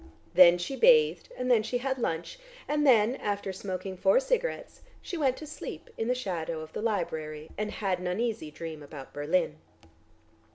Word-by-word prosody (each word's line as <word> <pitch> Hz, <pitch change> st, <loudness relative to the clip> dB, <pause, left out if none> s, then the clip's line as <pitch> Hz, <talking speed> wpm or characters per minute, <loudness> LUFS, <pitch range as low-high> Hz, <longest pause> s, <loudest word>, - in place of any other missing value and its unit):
Then 175 Hz, -1 st, +8 dB
she 175 Hz, +10 st, -4 dB
bathed 465 Hz, -, +5 dB
and 250 Hz, 0 st, 0 dB
then 230 Hz, -3 st, +5 dB
she 240 Hz, +3 st, -2 dB
had 265 Hz, +1 st, -2 dB
lunch, 170 Hz, -, -3 dB, 0.3 s
and 295 Hz, 0 st, +1 dB
then, 235 Hz, 0 st, +5 dB
after 200 Hz, -2 st, -3 dB
smoking 190 Hz, 0 st, -5 dB
four 290 Hz, -, +4 dB
cigarettes, -, -, -2 dB, 0.2 s
she 365 Hz, -, -6 dB
went 270 Hz, -6 st, +1 dB
to 310 Hz, -, -8 dB
sleep 305 Hz, +10 st, -8 dB
in 225 Hz, -, -2 dB
the 250 Hz, -, +2 dB
shadow 170 Hz, -9 st, -3 dB
of 155 Hz, 0 st, -10 dB
the -, -, -4 dB
library 160 Hz, -8 st, -3 dB
and 210 Hz, +1 st, -2 dB
had 195 Hz, -4 st, -1 dB
an 180 Hz, -, -4 dB
uneasy 215 Hz, -2 st, -2 dB
dream 160 Hz, 0 st, -7 dB
about 145 Hz, -2 st, -10 dB
Berlin. 150 Hz, +2 st, 0 dB
210 Hz, 175 wpm, -29 LUFS, 170-265 Hz, 0.3 s, Then